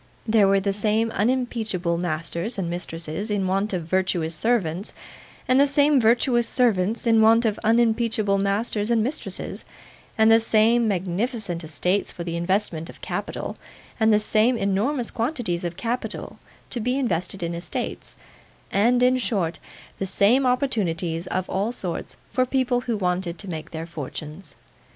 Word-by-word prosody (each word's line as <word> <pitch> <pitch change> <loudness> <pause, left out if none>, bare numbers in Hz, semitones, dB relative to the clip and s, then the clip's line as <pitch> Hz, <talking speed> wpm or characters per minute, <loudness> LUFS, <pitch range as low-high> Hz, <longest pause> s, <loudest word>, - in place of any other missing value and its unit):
There 215 -2 +4
were 195 0 +4
the 195 0 -1
same 215 +2 +1
unimpeachable 220 -7 0
masters 170 +5 -2
and 190 -3 -2
mistresses 170 +2 -4
in 205 -2 0
want 195 +3 0
of 180 -3 -2
virtuous 175 -2 0
servants, 195 -1 -1 0.5
and 255 +1 +4
the 285 - +6
same 285 -1 +4
virtuous 240 +1 +3
servants 225 -3 +1
in 225 -1 +5
want 225 +2 +5
of 215 -2 0
unimpeachable 225 -2 +2
masters 205 +2 -1
and 230 -2 +3
mistresses, 270 +7 -4 0.5
and 220 0 +5
the 225 - +7
same 225 +1 +3
magnificent 190 0 -2
estates 180 +5 -1
for 170 - -7
the 170 -1 -4
investment 170 -2 -1
of - - -12
capital, - - -4 0.4
and 220 0 +4
the 210 - +5
same 220 +3 +2
enormous 225 +6 0
quantities 230 - -2
of 175 0 -4
capital 235 +5 -4 0.3
to 245 - -1
be 250 +4 0
invested 190 -7 -2
in 170 0 -2
estates, 170 +1 -5 0.6
and, 240 +5 +3
in 255 +1 +4
short, 190 -9 -1 0.4
the 195 - -2
same 230 +8 +3
opportunities 185 -10 0
of 185 0 -2
all 200 +4 -1
sorts 180 -8 -5
for 255 0 +1
people 255 -2 +1
who 235 -3 -2
wanted 180 -2 -1
to 200 - -7
make 160 -2 -6
their 160 0 -5
fortunes. 155 +1 -7
205 Hz, 155 wpm, -24 LUFS, 175-235 Hz, 0.6 s, the